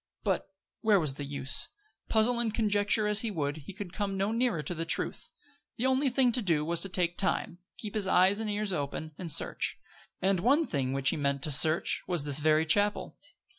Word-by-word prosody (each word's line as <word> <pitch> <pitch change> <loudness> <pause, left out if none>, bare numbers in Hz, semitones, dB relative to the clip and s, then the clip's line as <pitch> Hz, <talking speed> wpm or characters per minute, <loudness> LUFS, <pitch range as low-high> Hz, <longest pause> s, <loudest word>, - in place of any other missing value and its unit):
But - - -1 0.3
where 215 -3 +4
was 150 -5 0
the 145 +1 -7
use? 140 0 -1 0.4
Puzzle 235 +2 +2
and 235 -2 0
conjecture 210 0 +1
as 210 0 +4
he 230 - -2
would, 145 -6 -3
he 155 +5 -10
could 195 -3 -8
come 195 -2 -3
no 195 +2 0
nearer 230 -9 0
to 175 - -2
the 165 -1 -4
truth. 165 - -3 0.5
The 245 - -2
only 265 +1 +2
thing 255 -1 +2
to 245 +1 -1
do 165 -7 +1
was 170 +1 -2
to 195 - -4
take 175 -1 0
time; 185 -2 +1 0.2
keep 210 -2 -7
his 210 -3 0
eyes 190 +2 +3
and 220 -1 -3
ears 205 -1 -2
open, 150 0 -4
and 175 -3 -2
search. - - 0 0.4
And 190 -1 +1
one 280 - +3
thing 135 - -2
which 135 -1 +1
he - - -2
meant 140 -1 -1
to 155 - 0
search 155 +4 +4
was 175 -5 0
this 145 0 +1
very 155 +1 +2
chapel. 205 +6 0
185 Hz, 210 wpm, -29 LUFS, 155-215 Hz, 0.5 s, where